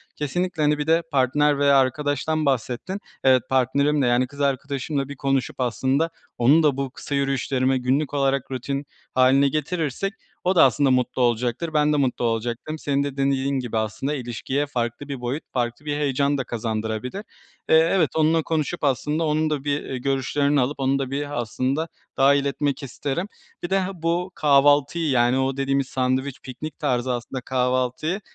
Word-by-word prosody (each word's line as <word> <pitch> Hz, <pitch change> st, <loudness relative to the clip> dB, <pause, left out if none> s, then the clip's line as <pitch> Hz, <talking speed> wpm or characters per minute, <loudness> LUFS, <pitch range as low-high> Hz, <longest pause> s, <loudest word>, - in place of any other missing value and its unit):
Kesinlikle, 175 Hz, +3 st, -2 dB
hani, 150 Hz, 0 st, +3 dB
bir 150 Hz, +1 st, -3 dB
de 165 Hz, +1 st, +3 dB
partner 145 Hz, +2 st, +2 dB
veya 140 Hz, -1 st, +5 dB
arkadaştan 145 Hz, +3 st, 0 dB
bahsettin. 135 Hz, -, -1 dB, 0.2 s
Evet, 130 Hz, -2 st, +5 dB
partnerimle, 140 Hz, +2 st, +2 dB
yani 120 Hz, +1 st, +2 dB
kız 145 Hz, +2 st, -9 dB
arkadaşımla 140 Hz, 0 st, -1 dB
bir 140 Hz, -, -6 dB
konuşup, 135 Hz, -1 st, -1 dB
aslında 130 Hz, +5 st, +1 dB, 0.3 s
onun 140 Hz, +7 st, +5 dB
da 145 Hz, -3 st, +3 dB
bu 135 Hz, -1 st, -2 dB
kısa 140 Hz, -, -5 dB
yürüyüşlerime 135 Hz, -1 st, +1 dB
günlük 135 Hz, +4 st, 0 dB
olarak 135 Hz, -2 st, 0 dB
rutin 135 Hz, +2 st, -3 dB, 0.3 s
haline 130 Hz, +2 st, +5 dB
getirirsek 155 Hz, -, -2 dB, 0.3 s
o 185 Hz, +1 st, +2 dB
da 170 Hz, -, +7 dB
aslında 135 Hz, +1 st, +3 dB
mutlu 125 Hz, 0 st, +1 dB
olacaktır. 125 Hz, +6 st, 0 dB
Ben 150 Hz, 0 st, +3 dB
de -, -, +2 dB
mutlu 130 Hz, -3 st, 0 dB
olacaktım. 120 Hz, +6 st, -2 dB
Senin 140 Hz, -1 st, 0 dB
de 140 Hz, -1 st, -5 dB
dem 135 Hz, 0 st, +2 dB
dediğin 135 Hz, 0 st, 0 dB
gibi 120 Hz, -3 st, -3 dB
aslında 110 Hz, +6 st, -2 dB
ilişkiye 130 Hz, +2 st, -2 dB
farklı 125 Hz, 0 st, -3 dB
bir 140 Hz, -3 st, -5 dB
boyut, 125 Hz, +5 st, -3 dB
farklı 120 Hz, +3 st, -2 dB
bir 145 Hz, -1 st, -1 dB
heyecan 140 Hz, 0 st, +1 dB
da 135 Hz, -, -1 dB
kazandırabilir. 110 Hz, -, -3 dB, 0.5 s
Eee, -, -, +6 dB, 0.2 s
evet 175 Hz, -6 st, +3 dB
onunla 160 Hz, +1 st, +3 dB
konuşup 160 Hz, +2 st, -2 dB
aslında, 150 Hz, +3 st, 0 dB
onun 155 Hz, 0 st, +1 dB
da 145 Hz, -3 st, -2 dB
bir, 145 Hz, 0 st, -1 dB
eee, 130 Hz, -, -5 dB
görüşlerini 140 Hz, +2 st, +1 dB
alıp, 140 Hz, +4 st, -2 dB
onun 135 Hz, +1 st, +1 dB
da 135 Hz, -1 st, -3 dB
bir 145 Hz, -2 st, -2 dB
aslında 130 Hz, +7 st, -2 dB, 0.3 s
dahil 140 Hz, +1 st, +4 dB
etmek 140 Hz, +1 st, -1 dB
isterim. 140 Hz, +7 st, -3 dB, 0.4 s
Bir 175 Hz, -, -3 dB
de, 195 Hz, 0 st, +2 dB
ha 190 Hz, 0 st, -2 dB
bu 175 Hz, +2 st, 0 dB
kahvaltıyı, 145 Hz, +2 st, +3 dB
yani 125 Hz, -1 st, +3 dB
o 135 Hz, 0 st, 0 dB
dediğimiz 135 Hz, -1 st, 0 dB
sandviç, 130 Hz, +1 st, -1 dB
piknik 135 Hz, +4 st, -8 dB
tarzı 125 Hz, 0 st, 0 dB
aslında 125 Hz, +2 st, -5 dB
kahvaltıyı, 130 Hz, -, -1 dB
140 Hz, 170 wpm, -23 LUFS, 130-150 Hz, 0.5 s, da